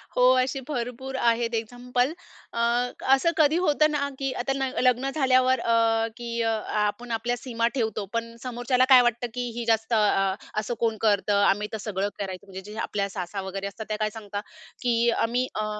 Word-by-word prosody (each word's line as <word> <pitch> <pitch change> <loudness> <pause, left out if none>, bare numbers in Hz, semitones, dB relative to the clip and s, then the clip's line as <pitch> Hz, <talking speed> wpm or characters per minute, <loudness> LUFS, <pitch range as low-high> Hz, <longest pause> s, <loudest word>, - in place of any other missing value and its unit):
हो. 250 - +3 0.2
असे 265 +1 -3
भरपूर 260 -1 -4
आहेत 235 0 +1
एक्झाम्पल. 245 +4 -1 0.4
अ, 235 - -3 0.6
असं 335 +5 +1
कधी 310 +1 +4
होतं 305 0 +3
ना 280 -1 0
की 270 -1 -1
आता 270 +2 -1
न 270 -1 -1
लग्न 255 +1 +2
झाल्यावर 260 -2 +3
अ, 225 -1 +2
की 235 -1 -6
अ, 225 - +1 0.3
आपण 230 +4 -3
आपल्या 240 +2 -1
सीमा 235 -2 -1
ठेवतो. 220 -5 -1
पण 230 0 -3
समोरच्याला 250 +1 +1
काय 255 -2 +9
वाटतं? 240 0 0
की 245 -1 -3
ही 240 - -3
जास्त 225 0 +1
अ, 195 -3 +3 0.3
असं 220 +3 -3
कोण 225 -2 0
करतं. 205 -1 +2
आम्ही 210 +2 +2
तर - - -1
सगळं 200 0 -1
करायचं 195 0 -5
म्हणजे 190 0 -8
जे 215 - -9
आपल्या 200 -2 -2
सासा 190 0 -5
वगैरे 195 +1 -4
असतात 215 +2 -7
त्या 215 - -1
काय 215 0 0
सांगता, 205 -2 -6 0.4
की 235 -1 +2
आम्ही 245 +3 +1
अ, 215 - 0
235 Hz, 185 wpm, -26 LUFS, 215-250 Hz, 0.6 s, काय